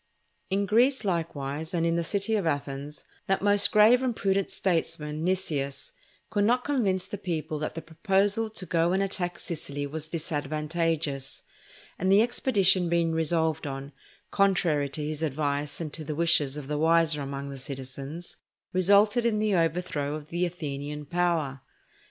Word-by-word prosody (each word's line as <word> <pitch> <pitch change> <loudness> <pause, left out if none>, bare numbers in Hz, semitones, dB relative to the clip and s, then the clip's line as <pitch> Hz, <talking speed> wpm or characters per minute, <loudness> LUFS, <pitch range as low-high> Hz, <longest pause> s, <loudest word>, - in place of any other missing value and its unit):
In 200 +1 +1
Greece, 240 +4 +3
likewise, 160 -2 -2
and 165 -1 +1
in 165 0 +2
the 170 - 0
city 200 +5 0
of 200 -6 0
Athens, 145 0 -3 0.2
that 195 0 +1
most 205 0 +4
grave 220 +4 +6
and 250 -3 0
prudent 195 -1 0
statesman, 155 -4 -1
Nicias, 155 -7 -1 0.4
could 205 -2 +1
not 245 +4 +3
convince 200 -10 0
the 200 +1 -6
people 160 -5 -3
that 155 - -4
the 165 - -5
proposal 200 +6 +1
to 205 -3 -3
go 170 +1 +1
and 195 +1 +2
attack 180 -2 -2
Sicily 145 -3 -4
was 155 +2 -6
disadvantageous; 155 -2 -2 0.6
and 185 +2 +1
the 200 +3 +7
expedition 195 -7 +2
being 170 -1 +2
resolved 160 -2 0
on, 135 +1 -6 0.4
contrary 175 -8 +2
to 150 +2 -4
his 155 0 -4
advice 145 -1 -1
and 155 -3 -5
to 160 - -5
the 150 0 -4
wishes 150 -4 +2
of 145 -2 -7
the 150 0 -2
wiser 160 -1 +3
among 140 0 -5
the 135 - -7
citizens, 135 +4 -6 0.4
resulted 200 +6 +4
in 230 -2 +1
the 210 -1 +1
overthrow 165 -4 0
of 155 -1 -9
the 175 +1 0
Athenian 150 -3 -5
power. 160 -5 0
165 Hz, 160 wpm, -27 LUFS, 150-195 Hz, 0.6 s, the